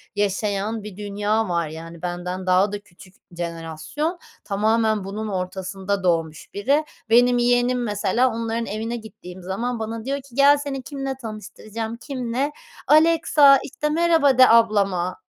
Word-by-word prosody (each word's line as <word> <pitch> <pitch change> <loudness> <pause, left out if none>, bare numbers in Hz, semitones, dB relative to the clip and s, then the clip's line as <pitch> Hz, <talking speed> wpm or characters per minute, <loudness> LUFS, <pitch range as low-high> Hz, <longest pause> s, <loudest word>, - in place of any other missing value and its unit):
yaşayan 205 +1 -1
bir 205 -3 -9
dünya 210 +1 -1
var 170 -2 0
yani. 165 +2 -9
Benden 180 +1 -4
daha 185 +2 +3
da 205 - -4
küçük 185 -2 -18 0.2
jenerasyon. 170 - -4 0.2
Tamamen 215 +1 +1
bunun 210 +3 -5
ortasında 190 +1 -3
doğmuş 165 -3 -1
biri. 275 +9 +1 0.3
Benim 245 +2 +5
yeğenim 245 +1 +2
mesela 215 +3 +1
onların 230 0 -2
evine 225 +3 -4
gittiğim 190 -4 -11
zaman 230 +6 -3
bana 225 0 -5
diyor 275 +1 -1
ki 260 -3 -18
"gel 280 +1 +6
seni 280 -2 -4
kiminle 270 -1 -4
tanıştıracağım." 220 0 -6
Kiminle? 255 +2 -3 0.4
"Alexa, 310 -3 +6
işte, 300 +2 -3
merhaba 320 -4 +3
de 255 0 +8
ablama." 200 -6 +2
220 Hz, 135 wpm, -22 LUFS, 190-250 Hz, 0.4 s, de